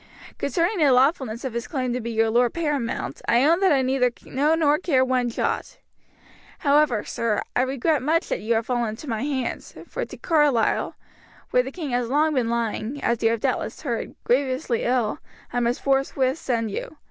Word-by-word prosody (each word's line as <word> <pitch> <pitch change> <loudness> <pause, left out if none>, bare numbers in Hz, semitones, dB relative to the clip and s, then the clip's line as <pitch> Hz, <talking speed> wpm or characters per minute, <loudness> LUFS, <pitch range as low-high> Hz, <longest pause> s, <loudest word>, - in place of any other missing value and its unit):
Concerning 345 - 0
the 295 -4 +5
lawfulness 255 -3 +2
of 255 - -3
his 235 -1 -3
claim 255 -5 -2
to 250 - -2
be 235 - -4
your 225 -1 +1
lord 240 +1 +2
paramount, 295 -8 -2
I 240 +2 +4
own 335 +3 +4
that 385 -1 +4
I 270 -2 +3
neither 255 -1 +2 0.2
know 295 +5 +1
nor 300 -2 +3
care 265 -8 +2
one 255 -1 +1
jot. 230 - -2 0.8
However, 285 -6 +3
sir, 225 -3 -1
I - - +3
regret 270 +3 +1
much 320 +5 +1
that - - -1
you 225 +2 +1
have 225 0 0
fallen 240 -2 0
into 220 +8 -8
my 225 -3 -2
hands, 270 -2 -3
for - - -4
to - - -8
Carlisle, 295 -8 +2 0.6
where 250 - +4
the 255 - -5
king 305 -4 -5
has 245 -1 0
long 305 +3 +2
been 250 -4 +1
lying, 235 +3 -2
as 235 -1 +1
you 225 - +4
have 230 -1 -1
doubtless - - -2
heard, 240 -6 -3
grievously 255 -1 0
ill, 245 -3 0 0.3
I 245 - +1
must 240 +1 -1
forthwith 270 +1 +1
send 230 -4 -1
you. 305 - -6
255 Hz, 195 wpm, -24 LUFS, 235-290 Hz, 0.8 s, the